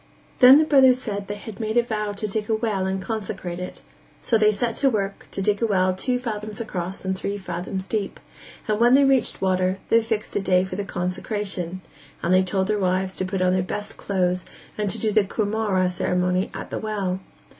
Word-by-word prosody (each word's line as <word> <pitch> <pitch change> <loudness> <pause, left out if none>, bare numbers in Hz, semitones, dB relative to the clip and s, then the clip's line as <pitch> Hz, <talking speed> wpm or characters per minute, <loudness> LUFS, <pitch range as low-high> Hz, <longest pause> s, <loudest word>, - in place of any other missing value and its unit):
Then 255 +2 +10
the 310 - +4
brothers 265 -4 +5
said 215 -6 -4
that 200 -1 -6
they 205 - -4
had 205 +1 -9
made 220 +1 -1
a 240 - +5
vow 215 -3 -2
to 205 +1 -4
dig 210 +1 -3
a 220 - +3
well 215 -4 -1
and 190 0 -1
consecrate 190 -4 -4
it; 180 - -7 0.4
so 235 - 0
they 215 -1 +5
set 225 +2 -1
to 275 - +4
work 200 -4 -3
to 195 - -3
dig 205 +1 +1
a 230 - +3
well 185 -3 +2
two 250 +7 -1
fathoms 215 -4 -5
across 190 -4 -5
and 190 0 0
three 200 +2 -3
fathoms 185 0 -4
deep; 205 -1 -3 0.5
and 215 0 0
when 240 +2 +6
they 280 - +6
reached 270 -2 +2
water, 185 0 +1
they 230 - +5
fixed 220 -1 -3
a - - +1
day 185 -1 +3
for 190 0 -5
the 200 +1 -3
consecration; 185 -1 -3 0.4
and 170 - +2
they 185 - +6
told 190 +1 0
their 210 +1 0
wives 185 0 0
to 185 - -1
put 185 0 -1
on 180 0 +3
their 185 - +2
best 205 +3 -4
clothes 180 -2 0 0.3
and 210 -1 -1
do 220 - 0
the 215 0 +4
cumaura 215 +1 -1
(betrothal) 180 - +2
ceremony 180 +1 0
at - - -7
the - - -2
well. 200 -4 -2
200 Hz, 220 wpm, -23 LUFS, 185-220 Hz, 0.5 s, Then